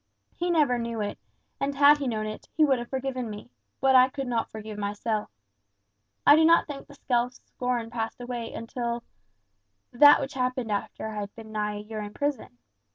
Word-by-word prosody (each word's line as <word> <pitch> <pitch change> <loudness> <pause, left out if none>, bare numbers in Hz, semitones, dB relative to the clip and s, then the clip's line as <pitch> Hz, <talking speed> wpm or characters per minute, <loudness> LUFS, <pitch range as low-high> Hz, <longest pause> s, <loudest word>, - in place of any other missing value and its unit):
He 350 +1 -2
never 295 -8 +3
knew 230 -1 -3
it; 205 -1 -3 0.4
and 280 0 -1
had 290 +1 +6
he 280 - -2
known 215 -3 -1
it, 215 0 -7
he 310 - +6
would 270 -4 +2
have 240 - -7
forgiven 260 -3 -3
me; 205 - -9 0.3
but 265 0 +4
I 255 0 +7
could 275 0 -5
not 235 -2 -1
forgive 215 -1 -8
myself. 210 +1 -2 1.0
I 290 - +9
do 320 - +5
not 335 +1 +5
think 285 -3 -8
the 285 - -14
self 245 -2 0
scorn 245 -3 -3
passed 225 -1 -4
away 245 -2 -5
until 235 +1 -4 0.9
that 290 +4 +8
which 270 +2 -4
happened 255 -3 -1
after 205 +1 -3
I 215 -1 -5
had 205 0 -6
been 220 -1 -11
nigh 210 -1 -2
a - - -5
year 215 0 -6
in 205 0 -8
prison. 285 - -3
240 Hz, 195 wpm, -27 LUFS, 220-270 Hz, 1.0 s, I